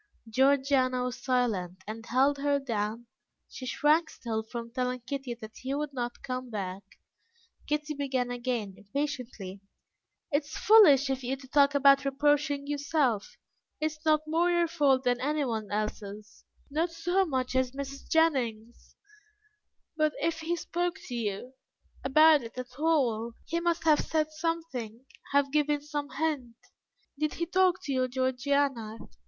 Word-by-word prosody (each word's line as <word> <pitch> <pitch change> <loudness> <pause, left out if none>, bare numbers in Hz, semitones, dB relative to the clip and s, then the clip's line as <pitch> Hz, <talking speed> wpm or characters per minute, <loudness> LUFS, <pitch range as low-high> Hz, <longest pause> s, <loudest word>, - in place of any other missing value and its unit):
Georgiana 260 +1 +3
was 250 0 -5
silent, 200 -8 0
and 220 +2 -7
held 275 +3 +3
her 285 0 +2
down; 230 -3 -3 0.4
she 255 - -8
shrank 310 +6 +3
still 225 -6 -3
from 230 +1 -7
telling 250 -1 -2
Kitty 260 -1 -4
that 220 -2 -11
he 265 +2 -3
would 295 -1 -3
not 240 -2 -4
come 255 -1 -4
back. 195 -3 -4 0.9
Kitty 300 0 -1
began 265 -4 -1
again 240 -5 -2
impatiently. 230 -5 -5 0.7
"It 290 +1 +2
is 305 - -8
foolish 295 - +6
of 265 0 -2
you 255 +2 -1
to 265 -1 -14
talk 285 +1 +4
about 275 0 +6
reproaching 285 +1 +1
yourself. 285 -6 0 0.4
It 310 0 0
is 305 - -13
not 310 -1 +4
more 330 +3 +2
your 345 -1 +3
fault 285 -5 +2
than 245 -1 +1
anyone 255 -7 -1
else's; 210 0 -5 0.3
not 320 +4 +1
so 350 +3 +1
much 260 -6 -2
as 260 -1 +1
Mrs. 275 0 -7
Jennings's, 240 -8 0 1.0
but 310 -1 +2
if 330 -1 0
he 330 +2 -1
spoke 345 0 -2
to - - -5
you 230 +2 -3 0.5
about 305 +2 +6
it 230 +1 -10
at 255 +1 -7
all, 245 -8 +1
he 335 - -1
must 340 -1 0
have 310 -2 +5
said 310 -1 0
something, 310 -8 -4 0.3
have 280 -1 +3
given 295 0 +2
some 295 0 -4
hint. 270 -4 -2 0.6
Did 305 0 0
he 340 - -1
talk 370 +1 +2
to 280 - -2
you, 255 -1 +1
Georgiana? 260 -2 0
275 Hz, 150 wpm, -29 LUFS, 245-300 Hz, 1.0 s, foolish